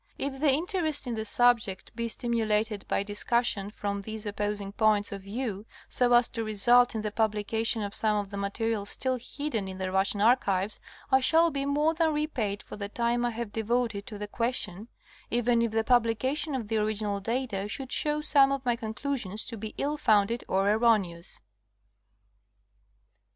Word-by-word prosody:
If 270 Hz, -1 st, -3 dB
the 300 Hz, 0 st, +3 dB
interest 315 Hz, -1 st, 0 dB
in 245 Hz, -, -3 dB
the 220 Hz, -1 st, -3 dB
subject 225 Hz, -4 st, +2 dB
be 235 Hz, 0 st, -2 dB
stimulated 220 Hz, -3 st, -1 dB
by -, -, 0 dB
discussion 205 Hz, 0 st, 0 dB
from 200 Hz, -1 st, -4 dB
these 220 Hz, +1 st, -6 dB
opposing 205 Hz, -1 st, -3 dB
points 210 Hz, -1 st, +2 dB
of 200 Hz, -1 st, -6 dB
view, 210 Hz, 0 st, -5 dB, 0.2 s
so 245 Hz, -1 st, +2 dB
as 240 Hz, 0 st, +6 dB
to 230 Hz, -, -4 dB
result 240 Hz, +3 st, +3 dB
in 215 Hz, -, -2 dB
the 210 Hz, -, -2 dB
publication 220 Hz, +1 st, +1 dB
of 200 Hz, 0 st, -5 dB
some 215 Hz, -1 st, +1 dB
of 205 Hz, -1 st, -3 dB
the 200 Hz, -, -5 dB
material 205 Hz, +1 st, -2 dB
still 255 Hz, +2 st, -2 dB
hidden 245 Hz, -6 st, -3 dB
in 190 Hz, 0 st, -7 dB
the 190 Hz, 0 st, -3 dB
Russian 195 Hz, +2 st, +1 dB
archives 205 Hz, -3 st, +2 dB, 0.3 s
I 265 Hz, -, +6 dB
shall 325 Hz, +5 st, +4 dB
be 275 Hz, -1 st, -2 dB
more 295 Hz, +3 st, +2 dB
than 320 Hz, -2 st, +1 dB
repaid 235 Hz, -10 st, -2 dB
for -, -, -9 dB
the 200 Hz, -1 st, -5 dB
time 235 Hz, +2 st, 0 dB
I 240 Hz, -, +1 dB
have 230 Hz, -2 st, -5 dB
devoted 225 Hz, -2 st, -1 dB
to 210 Hz, -, -7 dB
the 210 Hz, 0 st, -5 dB
question, 215 Hz, -3 st, -2 dB, 0.4 s
even 240 Hz, 0 st, +2 dB
if 230 Hz, -, +1 dB
the 220 Hz, +1 st, 0 dB
publication 255 Hz, +5 st, +1 dB
of 235 Hz, -5 st, -4 dB
the 220 Hz, +1 st, 0 dB
original 210 Hz, -1 st, -1 dB
data 225 Hz, -2 st, -2 dB
should 265 Hz, +3 st, -5 dB
show 300 Hz, 0 st, +1 dB
some 280 Hz, -2 st, +4 dB
of 275 Hz, -1 st, -3 dB
my 240 Hz, -1 st, +2 dB
conclusions 220 Hz, -2 st, -3 dB
to 230 Hz, -, -6 dB
be 220 Hz, 0 st, -7 dB
ill 295 Hz, +2 st, -1 dB
founded 220 Hz, -2 st, +2 dB
or 195 Hz, +1 st, +1 dB
erroneous. 205 Hz, -6 st, +1 dB
225 Hz, 175 wpm, -28 LUFS, 205-250 Hz, 0.4 s, as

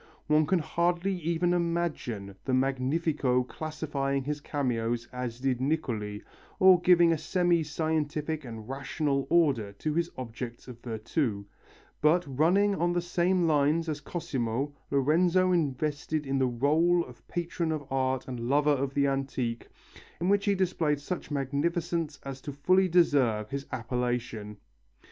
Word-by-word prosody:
One 150 Hz, 0 st, +3 dB
can 190 Hz, -, +3 dB
hardly 175 Hz, +4 st, 0 dB
even 170 Hz, +1 st, 0 dB
imagine 165 Hz, -, -2 dB
the 130 Hz, -, +1 dB
Magnifico 135 Hz, 0 st, +1 dB
classifying 140 Hz, -1 st, -3 dB
his 145 Hz, +1 st, -3 dB
cameos 120 Hz, -5 st, -1 dB
as 125 Hz, -2 st, -4 dB
did 130 Hz, -2 st, 0 dB
Niccoli, 115 Hz, -8 st, -2 dB, 0.4 s
or 185 Hz, -2 st, +7 dB
giving 175 Hz, -2 st, +5 dB
a 160 Hz, -, +1 dB
semi 175 Hz, +1 st, +2 dB
scientific 155 Hz, 0 st, -2 dB
and 115 Hz, -3 st, -8 dB
rational 140 Hz, +1 st, -1 dB
order 135 Hz, -12 st, +2 dB
to 150 Hz, +9 st, -3 dB
his 170 Hz, +1 st, 0 dB
objects 120 Hz, -1 st, -7 dB
of 120 Hz, -2 st, -10 dB
virtu, 110 Hz, -1 st, -2 dB, 0.6 s
but, 165 Hz, +4 st, +4 dB
running 175 Hz, +10 st, +3 dB
on 175 Hz, -2 st, 0 dB
the 175 Hz, -, +1 dB
same 175 Hz, +1 st, +1 dB
lines 155 Hz, +1 st, +2 dB
as 150 Hz, -2 st, -3 dB
Cosimo, 135 Hz, -4 st, -3 dB, 0.2 s
Lorenzo 170 Hz, +7 st, +3 dB
invested 150 Hz, -1 st, -1 dB
in 135 Hz, 0 st, 0 dB
the 130 Hz, -1 st, +2 dB
rôle 160 Hz, +8 st, +2 dB
of 125 Hz, -1 st, -16 dB
patron 170 Hz, -1 st, -2 dB
of 155 Hz, -2 st, -3 dB
art 130 Hz, -1 st, 0 dB
and 125 Hz, -2 st, -5 dB
lover 145 Hz, +2 st, +3 dB
of 140 Hz, -1 st, -1 dB
the 140 Hz, 0 st, +3 dB
antique, 135 Hz, -4 st, -2 dB, 0.5 s
in 175 Hz, +3 st, 0 dB
which 200 Hz, 0 st, +3 dB
he 200 Hz, -1 st, +3 dB
displayed 165 Hz, -6 st, 0 dB
such 165 Hz, +4 st, -5 dB
magnificence 155 Hz, +3 st, -1 dB
as 135 Hz, -1 st, -7 dB
to 145 Hz, -, -6 dB
fully 185 Hz, +7 st, +3 dB
deserve 135 Hz, -11 st, +2 dB
his 140 Hz, 0 st, -4 dB
appellation. 120 Hz, -4 st, -3 dB
145 Hz, 145 wpm, -29 LUFS, 130-170 Hz, 0.6 s, or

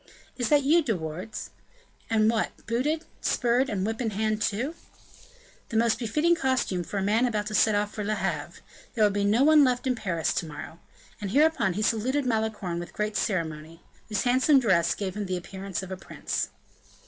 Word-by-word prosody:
"Is 245 Hz, -3 st, -1 dB
that 290 Hz, -2 st, +4 dB
you, 320 Hz, +5 st, +5 dB
De 235 Hz, -9 st, 0 dB
Wardes? 175 Hz, +7 st, -6 dB, 0.6 s
What! 220 Hz, 0 st, +2 dB
and -, -, -25 dB
booted, 295 Hz, +8 st, -1 dB, 0.2 s
spurred 245 Hz, +2 st, +1 dB
and 195 Hz, -3 st, -1 dB
whip 225 Hz, +3 st, -2 dB
in 230 Hz, -, 0 dB
hand, 215 Hz, +1 st, -1 dB
too?" 235 Hz, +10 st, -1 dB, 1.0 s
"The 225 Hz, -, -1 dB
most 230 Hz, 0 st, +2 dB
befitting 300 Hz, +9 st, +2 dB
costume 260 Hz, -, 0 dB
for 200 Hz, -, -5 dB
a 195 Hz, -, 0 dB
man 220 Hz, +5 st, +3 dB
about 210 Hz, -3 st, -1 dB
to 215 Hz, -, -5 dB
set 215 Hz, 0 st, +4 dB
off 205 Hz, 0 st, -1 dB
for 210 Hz, -, -4 dB
Le 215 Hz, +1 st, 0 dB
Havre. -, -, -3 dB, 0.3 s
There 220 Hz, -, +3 dB
will 205 Hz, -, +5 dB
be 200 Hz, 0 st, 0 dB
no 215 Hz, +6 st, +3 dB
one 305 Hz, 0 st, +7 dB
left 250 Hz, -1 st, +1 dB
in 260 Hz, -, +2 dB
Paris 185 Hz, -9 st, -1 dB
to 165 Hz, -, -2 dB
morrow." 155 Hz, +2 st, -9 dB, 0.4 s
And 200 Hz, -, -3 dB
hereupon 285 Hz, -, +3 dB
he 210 Hz, +4 st, -2 dB
saluted 255 Hz, +6 st, +1 dB
Malicorne 220 Hz, -7 st, -1 dB
with 175 Hz, -, -8 dB
great 210 Hz, 0 st, -2 dB
ceremony, 165 Hz, -3 st, -2 dB, 0.3 s
whose 210 Hz, -2 st, 0 dB
handsome 260 Hz, +3 st, +4 dB
dress 185 Hz, -9 st, +2 dB
gave 195 Hz, -2 st, -4 dB
him 210 Hz, -2 st, -3 dB
the 185 Hz, 0 st, -1 dB
appearance 190 Hz, +1 st, -5 dB
of 190 Hz, -, -8 dB
a 190 Hz, -, -4 dB
prince. -, -, -3 dB
215 Hz, 195 wpm, -27 LUFS, 195-250 Hz, 1.0 s, one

